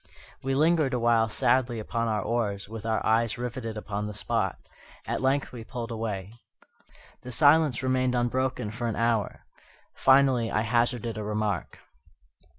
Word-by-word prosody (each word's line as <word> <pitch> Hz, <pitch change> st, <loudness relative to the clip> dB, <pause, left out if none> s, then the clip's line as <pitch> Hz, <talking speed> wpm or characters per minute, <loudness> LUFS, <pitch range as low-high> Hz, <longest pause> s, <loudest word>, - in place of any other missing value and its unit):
We 135 Hz, 0 st, -1 dB
lingered 155 Hz, -2 st, +3 dB
awhile 115 Hz, -2 st, +3 dB
sadly 120 Hz, +2 st, +1 dB
upon 115 Hz, +2 st, -2 dB
our 105 Hz, -3 st, 0 dB
oars, 105 Hz, -4 st, -2 dB
with 115 Hz, +1 st, -7 dB
our 110 Hz, -1 st, 0 dB
eyes 115 Hz, 0 st, +2 dB
riveted 120 Hz, -2 st, -5 dB
upon 105 Hz, -1 st, -4 dB
the 105 Hz, 0 st, -6 dB
spot. -, -, -1 dB, 0.5 s
At -, -, -2 dB
length 135 Hz, +2 st, +1 dB
we 120 Hz, -3 st, -8 dB
pulled 120 Hz, 0 st, -6 dB
away. 105 Hz, -3 st, -4 dB, 0.9 s
The 125 Hz, -, -8 dB
silence 145 Hz, 0 st, +4 dB
remained 130 Hz, -1 st, +1 dB
unbroken 120 Hz, -2 st, -1 dB
for 115 Hz, +2 st, -3 dB
an 115 Hz, -, -2 dB
hour. 115 Hz, -2 st, -1 dB, 0.5 s
Finally 130 Hz, -3 st, +4 dB
I 110 Hz, -, +1 dB
hazarded 115 Hz, 0 st, 0 dB
a -, -, -4 dB
remark. 105 Hz, -3 st, -2 dB
115 Hz, 150 wpm, -27 LUFS, 110-130 Hz, 0.9 s, silence